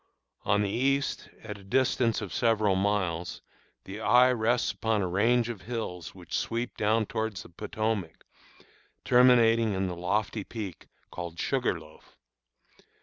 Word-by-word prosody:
On 105 +1 +2
the 100 - -1
east, 135 +5 0
at 105 -2 -7
a - - -15
distance 115 +2 +1
of 100 -5 -6
several 110 -4 +2
miles, 95 -4 -1 0.4
the 100 +2 -8
eye 125 +3 +5
rests 120 0 +1
upon 110 -3 0
a - - -1
range 115 +6 +2
of 115 -5 -6
hills 105 -8 -5
which - - -7
sweep 120 +1 -2
downward 110 0 +1
toward 110 -1 -2
the - - -8
Potomac, 105 0 -3 0.8
terminating 115 -3 +5
in 95 +1 0
the 90 -1 -3
lofty 100 +4 -1
peak 100 -5 -7 0.2
called 85 -1 -6
Sugarloaf. 85 - -3
110 Hz, 140 wpm, -28 LUFS, 95-115 Hz, 0.8 s, eye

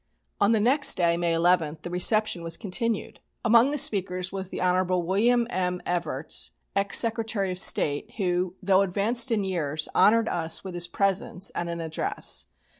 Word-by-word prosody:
On 200 - +3
the 225 - +2
next 265 +7 +3
day, 170 -1 +1
May 170 0 -1
11, 165 -2 +1
the 175 - -6
reception 185 +1 +1
was 165 0 -2
continued. 220 +2 -3 0.3
Among 235 +3 +5
the 295 - -2
speakers 185 -6 0
was 190 -1 -5
the - - -6
Hon. 180 0 +1 0.2
William 235 +6 +2
M. 180 -1 -2
Evarts, 160 -4 -2 0.2
ex 200 0 +2
Secretary 225 -4 0
of 180 - -4
State, 145 -5 +2
who, 180 -2 -1
though 190 0 +3
advanced 215 +6 +1
in 215 -3 0
years, 155 -5 -2
honoured 225 +1 +4
us 165 -4 -1
with 190 -2 -7
his 175 0 +1
presence 195 0 -1
and 170 - -4
an 170 0 -5
address. 160 -1 -1
185 Hz, 170 wpm, -25 LUFS, 175-215 Hz, 0.3 s, Among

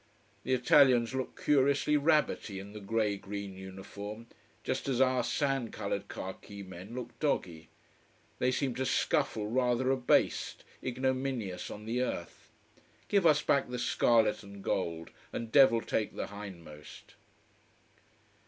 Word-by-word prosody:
The 130 - 0
Italians 125 -1 +5
look 130 -1 -4
curiously 140 +1 +3
rabbity 150 -8 +2
in 100 +2 -8
the 105 - -7
grey 105 0 0
green 100 0 -6
uniform: 100 +3 -8 0.4
just - - -2
as 130 -2 0
our 130 -2 +3
sand 135 -2 0
colored 100 -1 -3
khaki 100 +2 -7
men 95 +4 -9
look 125 -2 -5
doggy. 85 - -1 0.7
They 125 - +2
seem 130 0 0
to 130 - -1
scuffle 135 -9 +1
rather 125 +2 +1
abased, 130 -2 +1 0.2
ignominious 130 -6 -2
on 105 - -8
the 120 +3 -1
earth. 85 -9 -4 0.6
Give 200 -4 +4
us 150 -1 +4
back 140 -3 +2
the 125 - -3
scarlet 115 -2 +3
and 100 -1 -11
gold, 85 -3 -2 0.2
and 115 -1 -5
devil 130 -4 +6
take 110 - -2
the - - -3
hindmost. 85 -7 -10
115 Hz, 135 wpm, -31 LUFS, 100-130 Hz, 0.7 s, devil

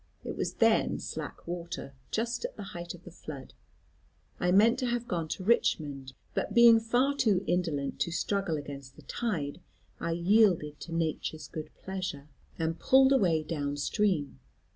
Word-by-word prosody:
It - - -4
was - - -2
then - - +3
slack - - -6
water, 170 -4 -5 0.2
just 235 - -1
at - - -4
the - - -6
height 175 0 -6
of 175 - -16
the 180 - -11
flood. 145 -5 -9 0.9
I 180 - +2
meant 215 +5 +5
to 255 - 0
have 240 0 -1
gone 165 -3 -2
to 185 - -4
Richmond, 145 - +1 0.2
but - - -2
being 235 -1 +8
far 245 +5 +2
too 210 -9 +2
indolent 160 -6 -1
to 170 - 0
struggle 185 -2 0
against 140 -2 -8
the - - -15
tide, 180 -9 -3 0.4
I 170 - -1
yielded 175 -4 +3
to 170 - -9
nature's 160 -2 -2
good 155 +2 -6
pleasure, 185 -7 -5 0.3
and 165 0 -1
pulled 265 0 +5
away 175 -11 +3
down 145 -3 -3
stream. 165 -1 0
175 Hz, 165 wpm, -30 LUFS, 150-215 Hz, 0.9 s, being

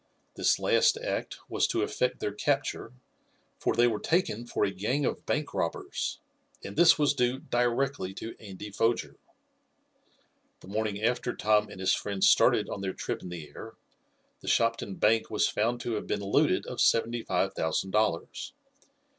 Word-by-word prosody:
This - - +2
last - - +3
act - - -3
was - - +1
to 355 +2 0
effect 125 - -1
their 105 - -1
capture, 135 +2 -1 0.7
for - - 0
they 120 - +5
were 110 -3 +1
taken 120 - 0
for 105 - 0
a 100 - -1
gang 115 +10 -1
of - - -3
bank 150 -1 -1
robbers, 85 - -2 0.5
and 100 - -7
this 175 -1 +6
was 145 -2 +3
due 125 -2 +1
directly 120 -4 -1
to 115 - -7
Andy 105 0 -9
Foger. 115 +4 0 1.4
The - - -14
morning 105 0 -2
after 125 +1 0
Tom 105 0 +2
and 95 - -10
his 95 - +2
friends 100 -2 +1
started - - +4
on 100 - -5
their 95 -1 -2
trip - - -4
in 90 - -8
the 85 -4 -7
air, - - -10 0.6
the - - -13
Shopton 115 -4 +1
Bank 110 +3 +2
was 105 - +2
found 120 +3 0
to 120 - -3
have 105 - -3
been - - -2
looted 100 - +2
of - - -4
seventy 115 +1 +2
five 95 -3 0
thousand 80 +4 -1
dollars. 105 -5 -1
115 Hz, 170 wpm, -29 LUFS, 100-125 Hz, 1.4 s, this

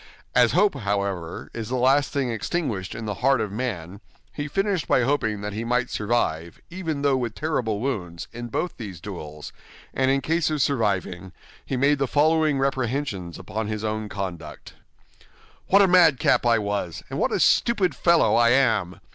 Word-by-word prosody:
As 125 -2 +4
hope, 200 +4 +4
however, 100 -7 -3
is 115 -1 -5
the 130 - -1
last 135 +3 +3
thing 135 -4 -1
extinguished 115 - -3
in 115 - -6
the 105 - -2
heart 135 0 +3
of 105 -3 -2
man, 100 -5 -4 0.3
he 145 0 -4
finished 195 +2 -1
by 125 - +3
hoping 110 -6 0
that 105 0 -4
he 110 +2 -3
might 125 +1 0
survive, 85 -7 -1
even 165 -6 -4
though 140 -2 +3
with 120 -4 -3
terrible 125 -9 -1
wounds, 95 -10 -4
in 120 +1 -6
both 175 +9 -3
these 100 -8 -7
duels; 75 -5 -8 0.4
and 130 0 +1
in 135 0 +2
case 165 +2 0
of 155 -1 -1
surviving, 95 -8 -1 0.3
he 130 - -3
made 140 +2 +3
the 135 - +1
following 155 +1 +2
reprehensions 130 - -2
upon 105 +4 -4
his 110 0 -4
own 110 -1 -3
conduct: 85 -7 -7 0.9
"What 200 +1 +6
a - - +4
madcap 165 -9 +4
I 115 -1 +4
was, 100 -5 -3
and - - -3
what - - +1
a - - 0
stupid 205 -6 +3
fellow 170 -1 +3
I 120 0 +5
am! 115 -8 +2
120 Hz, 175 wpm, -24 LUFS, 100-140 Hz, 0.9 s, What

